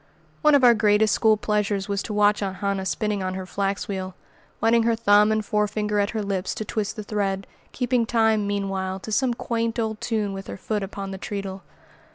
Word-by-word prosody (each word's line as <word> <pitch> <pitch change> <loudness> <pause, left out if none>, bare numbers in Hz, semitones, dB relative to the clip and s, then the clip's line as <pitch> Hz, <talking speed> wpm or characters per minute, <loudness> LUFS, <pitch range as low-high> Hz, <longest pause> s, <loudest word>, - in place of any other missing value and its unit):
One 300 -2 +5
of 275 - +4
our 240 -1 +8
greatest 210 -1 +3
school 220 -1 +4
pleasures 210 -2 -1
was 200 -1 -1
to - - -6
watch 210 0 +3
Aunt 195 -2 -2
Hannah 195 0 -2
spinning 210 -1 -1
on 185 0 -2
her 190 0 -5
flax 195 +1 -2
wheel, 190 -2 -4 0.4
wetting 230 +1 +4
her 230 0 +2
thumb 210 -1 +4
and 215 -1 0
forefinger 210 0 0
at 200 0 +1
her 220 -2 -2
lips 195 -2 -2
to 215 - -4
twist 210 -3 -2
the 215 - -6
thread, 195 -2 -2 0.3
keeping 245 -2 0
time, 220 -3 +2
meanwhile, 195 -2 -2
to 220 - -7
some 245 +2 +1
quaint 230 -1 -2
old 220 -2 -2
tune 215 -4 -1
with 195 0 -7
her - - -6
foot 210 +2 -2
upon 195 0 -5
the 190 - -6
treadle. 195 -1 -5
210 Hz, 205 wpm, -24 LUFS, 195-220 Hz, 0.4 s, our